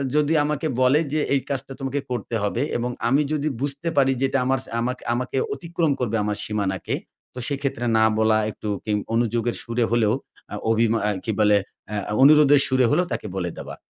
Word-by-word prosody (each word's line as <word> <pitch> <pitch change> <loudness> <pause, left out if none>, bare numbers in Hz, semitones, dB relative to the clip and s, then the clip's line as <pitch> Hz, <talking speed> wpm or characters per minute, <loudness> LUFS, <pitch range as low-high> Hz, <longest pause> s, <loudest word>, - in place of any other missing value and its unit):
যদি 150 +1 +3
আমাকে 150 +1 -1
বলে 130 +4 +5
যে 155 - +2
এই 140 - +3
কাজটা 135 -1 -3
তোমাকে 135 +1 -2
করতে 120 -1 -3
হবে 105 +4 -1 0.2
এবং 120 +1 -2 0.2
আমি 135 +5 +3
যদি 150 0 -1
বুঝতে 140 +3 -1
পারি 135 -1 +4
যে - - +4
এটা 135 - +1
আমার, 135 +1 +1 0.2
আমাক 125 +2 -1 0.2
আমাকে 125 +2 -2 0.2
অতিক্রম 170 -2 -1
করবে 115 -3 -1
আমার 105 0 -2
সীমানাকে, 100 -4 -2 0.4
তো 125 - -7
সেইক্ষেত্রে 140 -3 -2
না 110 - +4
বলা 110 0 +3
একটু 105 - -8 0.2
কিন 105 -1 +1 0.2
অনুযোগের 120 0 0
সুরে 115 0 0
হলেও, 110 -3 +3 0.4
আ - - -2 0.2
অভিমা 115 0 +2
আ - - +2
কি 110 - 0
বলে, 105 -1 +5 0.3
আ - - -3 0.3
অনুরোধের 145 -1 +7
সুরে 130 -1 +3
হলেও 180 - +3
তাকে - - -4
বলে 90 -2 -1
দেওয়া। - - -7
125 Hz, 190 wpm, -23 LUFS, 110-140 Hz, 0.4 s, অনুরোধের